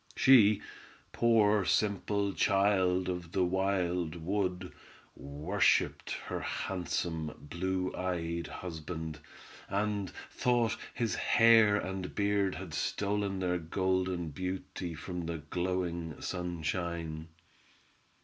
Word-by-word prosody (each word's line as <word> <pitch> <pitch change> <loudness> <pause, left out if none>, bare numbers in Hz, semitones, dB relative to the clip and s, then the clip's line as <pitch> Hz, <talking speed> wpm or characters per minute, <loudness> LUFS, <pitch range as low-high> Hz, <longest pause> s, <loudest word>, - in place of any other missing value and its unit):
She, 110 -6 +6 0.5
poor 105 -3 +4
simple 100 0 +1
child 95 -2 +2
of 90 -2 -4
the 95 -2 +3
wild 90 -3 0
wood, 90 +1 -2 0.4
worshiped 75 +8 +1
her - - -3
handsome, 85 -3 -3
blue 90 +4 -2
eyed 85 -2 -2
husband, 80 -2 -6 0.5
and 100 0 -1 0.2
thought 120 -3 +2 0.2
his 115 -3 0
hair 115 -3 +5
and 95 -2 -3
beard 100 -2 +1
had - - -7
stolen 100 -1 -1
their 90 -1 0
golden 90 0 -1
beauty 90 +1 -5
from 90 +1 -5
the 85 -1 -2
glowing 85 +1 -3
sunshine. 85 -2 -3
90 Hz, 95 wpm, -31 LUFS, 85-100 Hz, 0.5 s, She